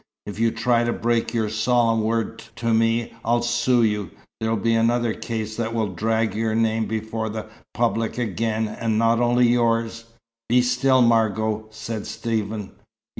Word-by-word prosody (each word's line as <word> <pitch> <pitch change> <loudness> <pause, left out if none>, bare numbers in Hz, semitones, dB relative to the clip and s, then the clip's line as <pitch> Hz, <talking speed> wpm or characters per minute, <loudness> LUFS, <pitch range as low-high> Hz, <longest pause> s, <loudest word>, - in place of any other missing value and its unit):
If 105 +1 -7
you 115 0 +3
try 120 +1 +1
to 120 - 0
break 115 0 0
your 115 -2 0
solemn 115 +1 +2
word 115 +1 -1 0.2
to 115 -2 -1
me, 115 +1 +1
I'll 120 +1 +1
sue 120 0 +2
you. 105 -5 0 0.3
There'll 110 0 0
be 115 +2 +1
another 115 0 +2
case 110 -2 -4
that 115 0 -2
will 110 -4 -1
drag 110 +4 0
your 110 0 -1
name 110 -1 +1
before 110 +1 -3
the 110 0 -5 0.3
public 115 -1 0
again, 110 0 -1
and 110 0 -2
not 115 +1 +3
only 120 0 +3
yours 115 -1 +1 0.2
" 115 0 -70
"Be 125 +1 +4
still, 125 +1 +3
Margot," 110 -1 +1
said 110 0 -6
Stephen. 110 -3 -3
115 Hz, 165 wpm, -23 LUFS, 110-120 Hz, 0.3 s, Be